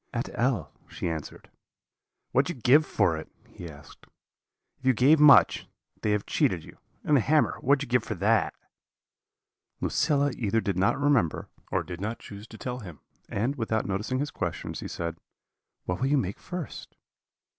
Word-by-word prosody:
"'At 120 - -2
L 120 - 0
,' - - -33
she - - -4
answered. 80 -3 -6 0.8
"'What 135 +3 +3
did 175 - -3
you 125 - -16
give 145 +5 +6
for 90 -6 +1
it?' 80 - -8 0.2
he 85 - -10
asked. 75 -1 -15 0.7
'If - - -16
you 130 - +6
gave 140 +7 +5
much, 150 -2 +6 0.3
they 110 - 0
have 105 -1 0
cheated - - +1
you; - - -15 0.2
and 150 - +3
the 135 - +5
hammer, 150 +7 +2
what 140 +3 +4
did 140 - -4
you 125 - -10
give - - -13
for 110 - -3
that?' 105 +5 +2 1.2
"Lucilla 145 -1 +1
either 115 -1 0
did 100 -4 -1
not 100 +8 +2
remember, 140 - +1 0.2
or - - +1
did 90 0 -8
not 110 +3 -3
choose 100 +2 -11
to 110 - -12
tell 125 +1 -5
him; 90 - -10 0.3
and, 125 +8 -1
without 110 -2 -1
noticing 105 +6 -2
his 145 +2 -2
questions, 85 -4 -4
she - - -5
said: 85 -1 -4 0.7
"'What 90 0 -2
will 130 - +2
you 145 +1 +3
make 100 -7 -2
first?' 180 -4 -7
115 Hz, 185 wpm, -27 LUFS, 95-140 Hz, 1.2 s, give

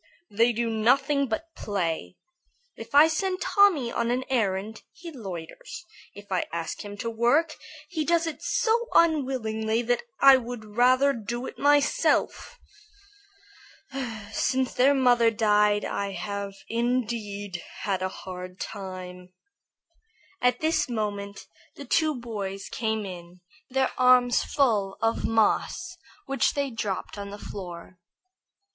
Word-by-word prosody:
"They 230 +4 +3
do 235 0 -1
nothing 270 +6 +2
but 325 +9 -4
play. 165 - -3 0.6
If - - -9
I 295 +2 +9
send 370 +3 -1
Tommy 365 - +3
on 235 0 -1
an 250 +2 0
errand, 215 -2 -1
he 340 -2 -10
loiters. 190 - -8 0.3
If 205 0 -13
I 185 - +1
ask 165 -1 -4
him 205 0 -8
to 230 - -3
work, 280 +8 +2 0.3
he 320 -4 -2
does 335 +1 +2
it 325 - -5
so 470 +1 +1
unwillingly 240 -8 +2
that 245 +1 +1 0.2
I 275 -1 +8
would 230 -4 -7
rather 255 +3 +4
do 240 +2 -5
it - - -8
myself. 290 - +2 1.7
Since 260 +4 0
their 275 +3 +4
mother 245 -3 +4
died 210 -2 +2
I 200 -1 -3
have 200 -1 -5
indeed 220 -5 -2 0.2
had 195 -2 -1
a 185 - -1
hard 185 0 -9
time." 185 -2 -7 1.1
At 250 0 +2
this 315 -3 +1
moment 205 -3 -4 0.3
the 285 - -9
two 310 +4 +2
boys 205 -5 -5
came 220 -2 -2
in, 175 -1 -10 0.3
their 265 0 +1
arms 250 -1 +5
full 215 -9 +1
of 225 +1 0
moss 225 - +1 0.3
which 275 0 +1
they 280 -2 -1
dropped 205 -2 -4
on 200 0 -6
the 205 - -8
floor. 180 -3 -9
230 Hz, 130 wpm, -26 LUFS, 200-270 Hz, 1.7 s, I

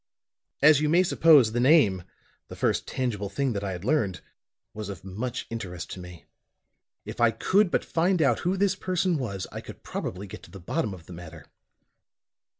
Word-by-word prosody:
"As 150 -1 +7
you 150 - +1
may 175 +4 +5
suppose, 155 -9 +5
the 120 - -1
name 120 - +4 0.5
the - - -9
first - - 0
tangible 105 -6 -2
thing 130 +5 -1
that 100 -1 -3
I 95 -1 -3
had 90 +2 -7
learned 110 -10 0 0.5
was 105 -1 -6
of 95 -4 -8
much 115 +7 -4
interest 90 -7 -6
to - - -7
me. 90 -2 -11 0.8
If - - -6
I 120 - +6
could 185 - +2
but - - 0
find 175 +2 +1
out 135 -7 +3
who 185 +2 -1
this 195 0 +2
person 185 -3 0
was, 100 -7 -4
I - - -6
could - - -12
probably 95 +3 -5
get 95 - -10
to - - -15
the 95 - -11
bottom 105 - -2
of 85 -3 -15
the 90 - -11
matter." 85 -1 -11
115 Hz, 190 wpm, -26 LUFS, 95-155 Hz, 0.8 s, As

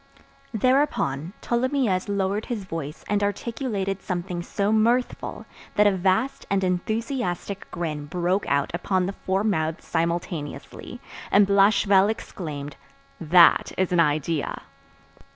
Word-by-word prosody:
Thereupon, 210 - +1
Tholomyès 240 -6 0
lowered 200 +1 -1
his 230 -5 -3
voice 165 -4 -6
and 205 0 +1
articulated 205 -2 -2
something 175 -1 -3
so 200 +4 -1
mirthful, 235 +3 0 0.3
that 210 - +5
a 205 - +6
vast 190 +8 0
and 195 -1 +1
enthusiastic 200 +1 -2
grin 150 -4 -4
broke 180 +4 -1
out 140 0 +1
upon 185 +1 0
the 195 - -3
four 190 +1 -1
mouths 160 -7 -1
simultaneously, 165 - -3 0.3
and 205 0 +5
Blachevelle 200 0 +4
exclaimed, 150 -9 -6 0.4
"That 170 +2 +5
is 185 -1 0
an 175 - +2
idea." 155 -1 0
190 Hz, 115 wpm, -24 LUFS, 170-210 Hz, 0.4 s, a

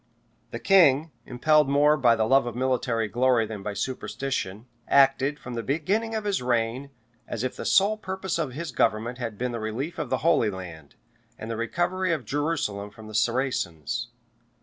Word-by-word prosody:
The - - -5
king, 160 -5 +4 0.2
impelled 150 +4 +3
more 145 +2 +4
by 125 -5 +4
the 110 -1 +1
love 135 +2 +3
of 120 - -5
military 125 -3 0
glory 120 +1 +2
than 105 -2 -7
by 100 0 -5
superstition, 130 -5 -3 0.2
acted, 135 +1 +4
from 125 -2 -8
the 115 - -2
beginning 195 - -1
of 220 - -2
his 205 -6 -1
reign, 125 +2 -1 0.4
as 115 - -4
if 130 - -2
the - - -6
sole 205 +3 +4
purpose 190 -3 -3
of 145 -6 -2
his 155 +2 -5
government 120 +1 0
had 115 -4 -4
been 125 +2 -2
the 120 - -4
relief 115 +9 -4
of - - -3
the - - -2
Holy 155 -10 +4
Land, 85 -6 -9 0.4
and 110 - -6
the - - -2
recovery 175 +10 -1
of 140 -7 -3
Jerusalem 140 -7 -2
from 110 +1 -14
the 110 - -10
Saracens. 115 - -1
130 Hz, 180 wpm, -26 LUFS, 115-155 Hz, 0.4 s, king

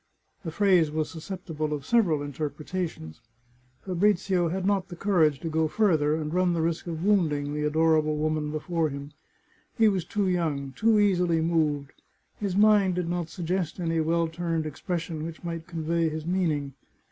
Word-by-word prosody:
The 170 - -4
phrase 180 -2 +3
was 155 0 -2
susceptible 160 -3 -5
of 145 -2 -5
several 180 -11 +2
interpretations. 145 - -5 0.6
Fabrizio 185 -2 +1
had 185 +2 -2
not 195 -2 +1
courage 165 -8 +2
to - - -4
go 160 0 +1
farther, 155 -6 +2
and 155 0 -3
run 180 -1 +2
the 165 - 0
risk 165 +1 -2
of 165 +1 -4
wounding 150 -8 +1
the 150 0 -1
adorable 155 0 +2
woman 155 0 -1
before 155 +1 -1
him. 140 +1 -7 0.7
He 225 -2 +5
was 190 -4 +1
too 205 +1 -1
young, 155 -7 -1
too 225 -1 +3
easily 180 -5 +3
moved. 155 -4 0 0.5
His 200 -3 -2
mind 205 -3 +4
did 180 -2 -2
not 175 -2 -2
suggest 175 -1 -3
any 165 -2 0
well 165 +1 +1
turned 165 -1 -2
expression 160 +1 -4
which 165 +1 -7
might 165 -1 -5
convey 165 -1 0
his 155 0 -5
meaning. 160 -6 0
165 Hz, 160 wpm, -27 LUFS, 155-185 Hz, 0.7 s, He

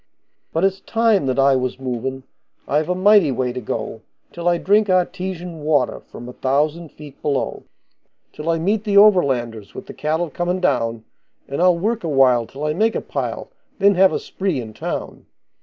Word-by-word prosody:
But 165 - -1
it's 195 0 +1
time 225 -8 +1
that 130 0 0
I 135 0 +4
was 130 0 -2
movin', 130 +1 -4 0.4
I've 150 +3 0
a 180 - +1
mighty 195 -4 +5
way 125 -1 -1
to 125 - -5
go 110 0 -5 0.3
Till 170 0 -4
I 175 - +2
drink 205 +3 +2
artesian 180 -2 -1
water 145 -5 +1
from 120 - -12
a 125 - -8
thousand 150 +6 -1
feet 150 -2 -13
below; 140 -3 -2 0.7
Till 150 +2 -5
I 165 - +2
meet 200 +6 0
the 205 -2 +1
overlanders 130 - +3
with - - -8
the - - -10
cattle 160 +2 -2
comin' 175 +4 -1
down, 115 -9 0 0.4
And 140 +4 -3
I'll 180 -1 +4
work 220 +5 -1
a 165 - -2
while 130 -5 +3
till 140 +2 -9
I 150 - 0
make 220 +7 +1
a - - -1
pile, - - -4 0.3
then 200 0 +4
have 190 0 +5
a - - 0
spree 190 -7 -3
in 110 -3 -7
town. - - -6
155 Hz, 190 wpm, -20 LUFS, 130-185 Hz, 0.7 s, mighty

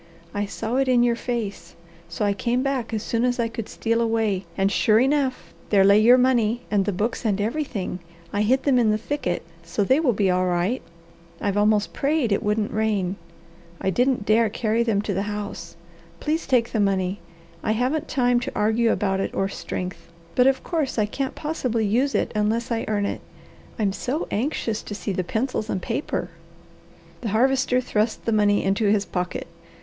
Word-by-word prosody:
"I 205 0 -1
saw 225 +4 -3
it 270 0 +2
in 245 -2 +4
your 240 -1 +3
face, 230 -4 -4 0.3
so 170 +5 -2
I 200 - +2
came 240 +5 0
back 270 -4 -1
as 220 -1 -2
soon 230 0 0
as 245 0 +1
I 235 - +2
could 230 -1 -6
steal 230 0 0
away, 220 -5 0
and 195 0 +2
sure 215 +1 +4
enough, 260 - 0 0.2
there 200 -2 +5
lay 200 +2 +6
your 240 +4 +7
money 245 -2 +2
and 200 -2 +2
the 205 - 0
books 210 +5 -2
and 205 -3 +1
everything. 215 -5 -2 0.3
I 205 - +1
hid 255 +5 +2
them 265 -3 +3
in 230 -3 +3
the 215 - +2
thicket, 220 -6 -2 0.2
so 205 - -1
they 260 +8 +3
will 280 -7 +2
be 195 -2 +2
all 185 0 +1
right. 180 +8 0 0.6
I've 200 -1 -1
almost 210 0 +2
prayed 280 -5 +1
it 200 - +2
wouldn't 210 0 0
rain. 210 -4 0 0.6
I 190 - 0
didn't 245 0 +1
dare 220 +1 +4
carry 220 +1 0
them 220 -3 +1
to 205 - -2
the 190 - 0
house. 200 -5 -6 0.4
Please 315 +2 -1
take 245 -3 +2
the 220 - 0
money. 195 -1 +1 0.4
I 215 - +1
haven't 255 +7 0
time 245 -2 +2
to 240 - -4
argue 220 +2 +2
about 195 -2 0
it - - -1
or 195 - +1
strength, 180 -2 -6 0.2
but 250 +1 +4
of 270 0 +2
course 315 -8 -2
I 215 - +3
can't 265 +5 -3
possibly 255 -8 -1
use 250 +7 +1
it - - 0
unless 225 +3 0
I 230 -1 -1
earn 205 -2 0
it. - - -3 0.6
I'm 205 -3 +1
so 255 - -2
anxious 225 -2 -1
to 205 - -7
see 205 - -3
the 185 -1 -1
pencils 220 +2 -2
and 190 - -1
paper." 175 0 -3 0.9
The 225 - -2
Harvester 255 +3 +2
thrust 220 -3 -1
the 230 - +1
money 205 -1 +3
into 195 +3 +1
his 205 0 +2
pocket. 180 -1 -3
220 Hz, 195 wpm, -24 LUFS, 205-245 Hz, 0.9 s, your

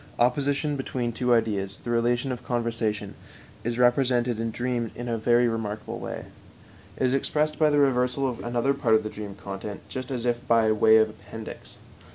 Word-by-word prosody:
Opposition 140 +4 +1
between 125 -3 -2
two 125 +2 -1
ideas, 105 -4 +1
the 120 - -3
relation 120 +2 +1
of 125 -1 -5
conversion, 115 -4 -2 0.5
is 120 +1 -2
represented 125 -1 +3
in 115 0 -1
dreams 120 0 -2
in 120 - -6
a 115 - 0
very 120 +2 +3
remarkable 110 -2 -3
way. - - -6 0.7
It - - +1
is 130 - +2
expressed 150 +2 0
by 155 -1 +5
the 145 - +2
reversal 135 -1 +2
of 125 -2 -4
another 120 +3 +1
part 125 -5 +2
of 110 - +2
the 110 - -4
dream 105 -2 -7
content 100 +1 -7
just 130 -1 -5
as 125 -3 -3
if 120 -1 -1
by 115 -2 +4
way 110 +1 +6
of 110 -1 +3
appendix. 110 +1 -10
120 Hz, 185 wpm, -26 LUFS, 110-125 Hz, 0.7 s, way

